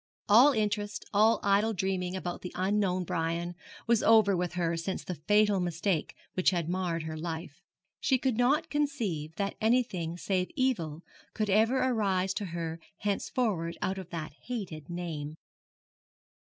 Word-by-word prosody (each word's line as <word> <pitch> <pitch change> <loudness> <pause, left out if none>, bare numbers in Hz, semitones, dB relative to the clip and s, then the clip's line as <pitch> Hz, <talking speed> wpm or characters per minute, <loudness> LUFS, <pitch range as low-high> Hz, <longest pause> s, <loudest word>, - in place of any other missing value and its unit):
All 240 +8 +8
interest, 210 -2 -1
all 215 +3 +5
idle 205 +3 +3
dreaming 185 -1 -1
about 175 -2 -4
the 180 - -6
unknown 185 -1 +1
Brian 170 +1 -2 0.3
was 230 -1 +3
over 220 -3 +5
with 175 -1 -2
her 170 -1 0
since 170 +3 -3
the 180 - -4
fatal 210 -1 +4
mistake 175 -1 -1 0.2
which 185 - +3
had 175 -4 -1
marred 175 -2 -1
her 160 0 -5
life. 165 0 -6 0.4
She 265 - +2
could 260 -2 0
not 285 +7 +2
conceive 225 - -1
that 200 +1 -1
anything 215 -8 +1
save 185 0 -1
evil 170 - 0 0.3
could 215 -2 0
ever 225 +6 +4
arise 195 -7 +1
to 205 - -3
her 165 -2 -4 0.2
henceforward 200 -4 -1
out 190 +1 -1
of 185 - -9
that 155 -3 -5
hated 185 - -5
name. 160 -4 -4
190 Hz, 150 wpm, -30 LUFS, 170-215 Hz, 0.4 s, All